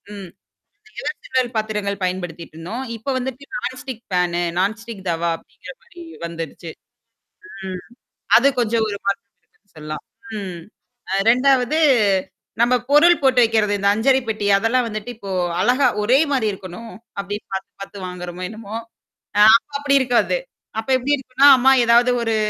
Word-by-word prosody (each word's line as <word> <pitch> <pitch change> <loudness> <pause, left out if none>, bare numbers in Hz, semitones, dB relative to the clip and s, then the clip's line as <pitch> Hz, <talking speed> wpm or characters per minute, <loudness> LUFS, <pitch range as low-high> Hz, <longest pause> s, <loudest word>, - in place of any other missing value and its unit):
ம் 195 -3 -9 0.7
ever - - -4
silver 255 -2 -1
பாத்திரங்கள் 210 -2 -2
பயன்படுத்திக்கிட்டு 175 -3 -5
இருந்தோம். 220 +11 -5
இப்ப 225 +4 -11
வந்துட்டு 260 +2 -5
non - - -4
stick 250 -4 -8
fan 175 -1 +1 0.2
non 200 +4 +1
stick 225 -5 -10
தவா 170 0 -1
அப்படிங்கிற - - -13
மாரி 350 -7 -14 0.2
வந்திருச்சு. 165 0 -7 1.0
ம் 185 -1 -5 0.6
அது 250 +4 +4
கொஞ்சம் 230 -1 +1
ஒரு 200 - -4
மாற்றம் 200 +4 -2
இருக்குன்னு 200 - -39
சொல்லலாம். 155 0 -7 0.4
ம். 185 -4 -6 0.5
அ - - 0 0.2
2வது 255 +3 +3 0.8
நம்ப 240 +1 +4
பொருள் 330 +4 +6
போட்டு 260 -2 +4
வைக்கிறது, 220 -2 +2
இந்த 200 0 0
அஞ்சரை 260 +5 +3
பெட்டி 215 -2 -2
அதெல்லாம் 235 +4 +1
வந்துட்டு 215 +1 -6
இப்போ 200 -3 -8 0.3
அழகா 250 +7 +3
ஒரே 240 +6 +4
மாரி 255 -6 +1
இருக்கணும் 195 +3 -9 0.3
அப்படின்னு 205 +1 -5
பாத்து-பாத்து 195 +1 -7
வாங்குறோமோ 180 0 -7
என்னமோ? 220 0 -8 0.6
அ - - +7 0.4
அப்படி 280 -1 +1
இருக்காது. 250 - +2 0.4
அப்ப 220 - -6
எப்டி 265 +3 0
இருக்கும்ன்னா, 265 +1 +3
அம்மா 260 +2 +5
ஏதாவது 240 +2 +5
ஒரு 225 -1 0
220 Hz, 145 wpm, -20 LUFS, 190-255 Hz, 1.0 s, அ